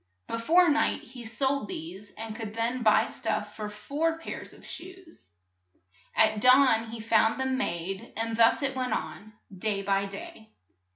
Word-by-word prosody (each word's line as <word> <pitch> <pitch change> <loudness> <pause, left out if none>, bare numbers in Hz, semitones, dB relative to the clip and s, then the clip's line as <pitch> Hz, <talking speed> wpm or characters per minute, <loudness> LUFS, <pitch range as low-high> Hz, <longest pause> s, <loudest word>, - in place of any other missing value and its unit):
Be - - -3
fore 345 +10 +5
night 300 -1 +2
he 245 0 -11
sold 265 +1 0
these, 190 +5 -7
and 225 0 -5
could 220 -2 -6
then 235 +2 -1
buy 215 -2 +5
stuff 215 -2 -3
for 210 -1 -5
four 290 +10 -2
pairs 325 - -7
of - - -15
shoes. 365 - -11 0.9
At 215 -1 +3
dawn 250 -3 +5
he 230 0 -7
found 225 +1 +2
them 265 0 0
made, 190 -6 -3
and 225 0 -1
thus 230 +5 +4
it 270 -1 -1
went 255 -1 -1
on, 215 +2 -5 0.2
day 200 +1 -2
by 195 0 +1
day. 220 - -10
225 Hz, 165 wpm, -28 LUFS, 210-265 Hz, 0.9 s, fore